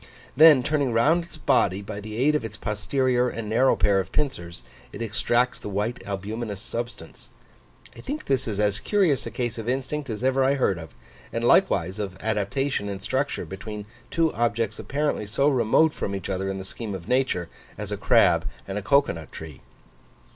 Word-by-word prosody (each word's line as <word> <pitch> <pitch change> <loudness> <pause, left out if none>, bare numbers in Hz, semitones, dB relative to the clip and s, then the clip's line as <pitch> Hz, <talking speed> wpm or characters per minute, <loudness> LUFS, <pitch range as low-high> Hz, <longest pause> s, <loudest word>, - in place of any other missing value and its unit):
Then 150 -3 +8
turning 140 -3 0
round 155 +10 +3
its 170 - -11
body, 100 -9 +2
by 100 0 -6
the 105 +1 -7
aid 140 +5 +3
of 150 - 0
its 110 -1 -6
posterior 125 +4 0
and 115 -2 -5
narrow 120 +5 +3
pair 100 -1 +3
of 95 - -4
pincers, 85 - -3 0.3
it - - -9
extracts 120 +2 0
the - - -6
white 105 +5 -2
albuminous 105 +1 -4
substance. 120 +3 -7 0.7
I - - -12
think 295 +3 -5
this 130 -2 0
is 105 -2 -3
as 105 0 +2
curious 185 - +1
a - - -3
case 120 -3 -3
of 115 +1 -4
instinct 135 +2 -2
as 110 +1 -4
ever 130 +1 +3
I 135 +1 +3
heard 100 -10 +1
of, 80 -2 -11 0.4
and - - -2
likewise 95 +5 +3
of 95 -3 -4
adaptation 110 +2 -1
in 100 -1 -4
structure 135 +7 -2
between 105 +2 -7 0.2
two 165 -2 +1
objects 115 -2 0
apparently 145 -7 -1
so 135 +7 +1
remote 140 +4 +3
from 100 - -3
each 95 -1 -5
other 95 +1 -2
in 95 - -3
the 95 - -6
scheme 105 0 -5
of 90 -2 -8
nature, 125 -9 +1 0.3
as 105 0 -6
a - - 0
crab 95 -3 +4 0.2
and 100 +1 -3
a - - -6
cocoa 140 - +3
nut 80 -2 -10
tree. 80 -4 -9
115 Hz, 190 wpm, -25 LUFS, 100-135 Hz, 0.7 s, Then